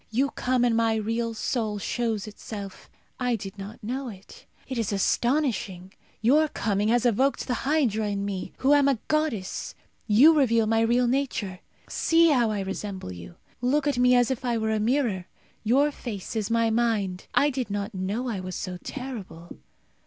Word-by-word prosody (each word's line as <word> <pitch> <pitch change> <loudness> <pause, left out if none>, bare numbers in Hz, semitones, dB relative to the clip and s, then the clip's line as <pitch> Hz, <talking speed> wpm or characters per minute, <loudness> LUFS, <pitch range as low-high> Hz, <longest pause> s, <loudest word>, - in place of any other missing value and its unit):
You 265 +5 +1
come, 250 -1 +1
and 235 -2 +2
my 225 -1 +2
real 230 +1 -1
soul 220 -2 -1
shows 225 0 -2
itself. 205 -2 -8 0.3
I 250 -2 +1
did 195 -2 -7
not 210 +4 -9
know 255 +4 -3
it. 195 -2 -13 0.2
It 260 -3 -3
is 220 -3 -1
astonishing. 205 - 0 0.3
Your 290 +8 +4
coming 205 -7 -1
has 240 +2 +2
evoked 255 +4 +2
the 250 - -1 0.2
hydra 230 -9 +2
in 200 0 -2
me, 195 -2 -4
who 275 +2 +3
am 285 -1 +5
a 275 -3 +3
goddess. 305 -12 -1 0.3
You 260 +10 +7
reveal 230 -6 +3
my 225 +1 +2
real 240 +2 +3
nature. 240 -8 -1 0.3
See 335 0 +3
how 245 -6 +3
I 210 -2 -1
resemble 195 - -5
you. 85 -1 -10 0.3
Look 275 +4 +1
at 280 -4 +1
me 250 0 +5
as 245 +1 +3
if 260 0 -3
I 240 -2 0
were 220 0 0
a 215 - +1
mirror. 220 -5 0 0.4
Your 275 +7 +3
face 225 -7 -6
is 215 -2 -1
my 230 0 +2
mind. 220 -5 0
I 290 +1 +4
did 255 -3 -3
not 205 +2 -3
know 200 +7 -2
I 220 -5 -2
was 185 0 -6
so 180 -2 -5
terrible. 220 -11 -7
230 Hz, 180 wpm, -26 LUFS, 205-255 Hz, 0.4 s, You